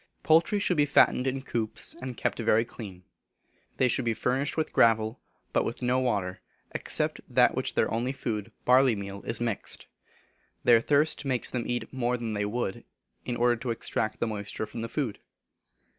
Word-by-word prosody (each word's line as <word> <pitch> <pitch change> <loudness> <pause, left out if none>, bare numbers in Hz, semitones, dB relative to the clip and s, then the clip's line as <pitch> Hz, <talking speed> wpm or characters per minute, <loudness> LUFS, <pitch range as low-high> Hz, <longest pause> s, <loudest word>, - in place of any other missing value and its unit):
Poultry 165 +6 +4
should 190 -4 0
be 145 0 +4
fattened 135 -2 +4
in 135 0 -2
coops, 110 -5 -1
and 130 -2 -6
kept - - -1
very 115 0 +3
clean. 95 -6 -9 0.7
They 130 - +4
should 125 +1 0
be 115 -1 0
furnished 135 +7 -1
with 160 - -1
gravel, 110 0 +3 0.3
but - - +3
with 120 - -4
no 125 +1 +2
water, 100 -8 -1 0.3
except - - 0
that - - +5
with - - -9
which - - -1
their - - +1
only 120 +3 0
food, 110 -6 -4
barley 130 -1 +5
meal, 100 0 -6
is 115 - -2
mixed. 115 -3 -2 0.8
Their 115 -2 +6
thirst 150 +5 +2
makes 130 -3 0
them 120 -2 -2
eat 120 +2 -3
more 125 -1 0
than 115 -2 -4
they 105 0 -1
would, 105 -2 -3 0.4
in 120 - -2
order 120 0 +3
to 120 +2 -5
extract 110 -1 -1
the - - +1
moisture 105 -1 -4
from 115 - -7
the 115 - -4
food. 125 -6 -2
120 Hz, 185 wpm, -28 LUFS, 110-130 Hz, 0.8 s, Their